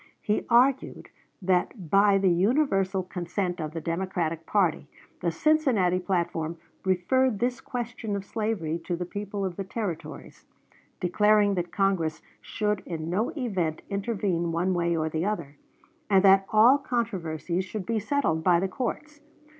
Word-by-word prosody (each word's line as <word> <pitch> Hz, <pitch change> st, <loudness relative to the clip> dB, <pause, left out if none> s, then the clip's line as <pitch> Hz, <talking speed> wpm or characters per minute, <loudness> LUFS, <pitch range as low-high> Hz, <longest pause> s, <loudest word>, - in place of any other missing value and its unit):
He 210 Hz, -, -1 dB
argued 255 Hz, +3 st, +2 dB, 0.3 s
that, 180 Hz, -1 st, 0 dB
by 200 Hz, 0 st, +5 dB
the 190 Hz, -2 st, +3 dB
universal 195 Hz, -, +2 dB
consent 180 Hz, 0 st, -3 dB
of 155 Hz, -, -3 dB
the 165 Hz, +2 st, -5 dB
Democratic 165 Hz, -1 st, -2 dB
party, 185 Hz, -7 st, +1 dB, 0.3 s
the 175 Hz, -, 0 dB
Cincinnati 215 Hz, -, +2 dB
platform 170 Hz, -3 st, -2 dB, 0.3 s
referred 205 Hz, +6 st, +2 dB
this 245 Hz, +3 st, -1 dB
question 235 Hz, -3 st, -4 dB
of 200 Hz, -1 st, -4 dB
slavery 200 Hz, -8 st, -2 dB
to 175 Hz, -, -1 dB
the 175 Hz, +1 st, -4 dB
people 200 Hz, +1 st, -4 dB
of 180 Hz, -2 st, -4 dB
the 195 Hz, -, -2 dB
Territories, 190 Hz, -4 st, -6 dB, 0.5 s
declaring 210 Hz, +2 st, +3 dB
that 175 Hz, -2 st, -3 dB
Congress 190 Hz, -6 st, 0 dB, 0.2 s
should 210 Hz, -2 st, -2 dB
in 165 Hz, -1 st, -4 dB
no 215 Hz, +8 st, 0 dB
event 185 Hz, -, -2 dB
intervene 195 Hz, -5 st, -1 dB
one 175 Hz, +3 st, 0 dB
way 170 Hz, -1 st, 0 dB
or 155 Hz, 0 st, 0 dB
the 160 Hz, +1 st, -2 dB
other, 170 Hz, -9 st, -3 dB, 0.5 s
and 195 Hz, -1 st, +5 dB
that 195 Hz, 0 st, +6 dB
all 235 Hz, +6 st, +6 dB
controversies 185 Hz, -, -2 dB
should 195 Hz, 0 st, -6 dB
be 230 Hz, -1 st, 0 dB
settled 205 Hz, -, 0 dB
by 175 Hz, -1 st, +4 dB
the 190 Hz, -, 0 dB
courts. 290 Hz, +7 st, -5 dB
190 Hz, 145 wpm, -27 LUFS, 170-215 Hz, 0.5 s, that